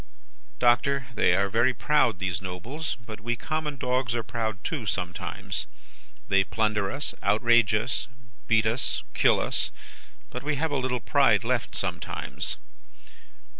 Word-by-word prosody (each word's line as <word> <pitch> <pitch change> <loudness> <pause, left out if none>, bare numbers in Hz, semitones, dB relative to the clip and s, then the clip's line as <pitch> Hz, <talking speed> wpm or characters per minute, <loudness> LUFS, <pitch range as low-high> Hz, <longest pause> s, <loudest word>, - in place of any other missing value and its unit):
"'Doctor, 125 +3 +3
they 90 - +3
are 100 +1 +2
very 120 +5 +2
proud, 140 -9 +3
these 95 -2 -2
Nobles; 105 - -5
but 110 -1 -8
we 120 +2 -1
common 155 +3 -3
dogs 125 -1 0
are 120 - -1
proud 110 -1 -2
too, 135 -10 -3
sometimes. 90 -2 -3 0.6
They 95 0 +4
plunder 105 -1 0
us, 145 +2 0
outrage 115 -1 +4
us, 115 +5 -1 0.4
beat 110 -1 +4
us, 115 +3 0
kill - - +4
us; - - 0 0.6
but 125 - -5
we 150 +2 -1
have 160 +2 -1
a - - 0
little 130 -2 -1
pride - - +4
left, - - -1
sometimes. - - -4
120 Hz, 140 wpm, -27 LUFS, 105-130 Hz, 0.6 s, They